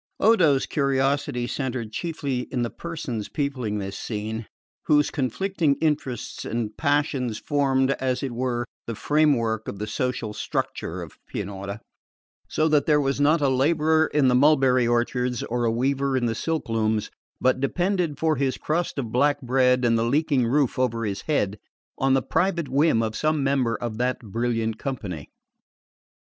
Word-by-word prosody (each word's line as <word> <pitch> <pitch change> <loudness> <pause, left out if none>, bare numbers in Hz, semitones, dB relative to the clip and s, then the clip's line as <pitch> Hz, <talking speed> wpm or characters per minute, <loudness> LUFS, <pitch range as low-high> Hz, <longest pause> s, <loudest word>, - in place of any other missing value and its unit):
Odo's 170 -11 +4
curiosity 140 -2 0
centred 120 -3 -3
chiefly 140 -3 -3
in 125 -2 0
the 120 - -3
persons 150 -11 -5
peopling 130 -8 -2
this 95 -1 -4
scene, 110 +1 -4 0.4
whose 150 -1 +4
conflicting 150 - 0
interests 145 -7 -2
and 110 -2 -3
passions 145 -6 0
formed, 135 -2 +1
as 130 +1 -1
it 135 - -2
were, 120 0 -1 0.2
the 115 - -3
framework 120 -7 +1
of 100 - -5
the 105 - -3
social 125 -1 -2
structure - - -3
of - - -13
Pianura, 100 0 -5 0.7
so 155 - +1
that 150 -3 +2
there 150 -2 +4
was 140 0 0
not 150 +2 +4
a 140 - +3
labourer 155 +4 +3
in 145 -3 +3
the 125 - +4
mulberry 130 -2 +4
orchards 120 +1 0
or 120 0 -1
a 115 - +2
weaver 135 +3 0
in 125 - 0
the 115 - 0
silk 160 +7 -2
looms 110 -1 0 0.3
but 130 0 +2
depended 175 +2 0
for 160 0 +1
his 135 -1 0
crust 165 +2 -2
of 120 -5 -3
black 145 +4 +2
bread 125 0 +3
and 115 -1 +3
the - - +1
leaking 135 0 +2
roof 135 0 +1
over 115 -3 0
his 100 -1 -3
head 105 -9 0 0.4
on 135 0 +3
the 135 - +1
private 170 -2 0
whim 140 -4 +3
of 110 0 -3
some 155 -2 +1
member 135 -4 +1
of 115 -2 -5
that 125 +1 +1
brilliant 115 0 -2
company. 100 - -5
130 Hz, 160 wpm, -24 LUFS, 115-145 Hz, 0.7 s, Odo's